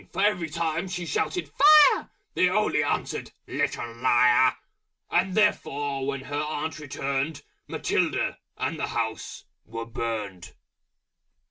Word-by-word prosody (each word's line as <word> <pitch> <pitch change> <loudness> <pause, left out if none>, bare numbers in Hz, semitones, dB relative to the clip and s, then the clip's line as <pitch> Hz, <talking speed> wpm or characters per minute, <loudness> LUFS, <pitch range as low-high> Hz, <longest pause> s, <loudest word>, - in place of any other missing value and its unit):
For 195 - 0
every 180 -6 +1
time 165 +2 -2
She 180 -1 -4
shouted 260 - -1
"Fire!" 300 +1 +6 0.2
They 180 - +3
only 210 +3 +1
answered - - -2
"Little 120 -1 -2
Liar!" 125 0 +4 0.6
And 185 +1 +1
therefore 145 -10 0
when 140 -1 -2
her 145 +2 -3
Aunt 155 +1 -4
returned, 140 +1 -3 0.2
Matilda, - - -1 0.2
and - - -2
the - - -1
House, - - -4 0.2
were 115 +1 -6
Burned. 110 -5 -5
145 Hz, 120 wpm, -26 LUFS, 130-180 Hz, 0.6 s, Fire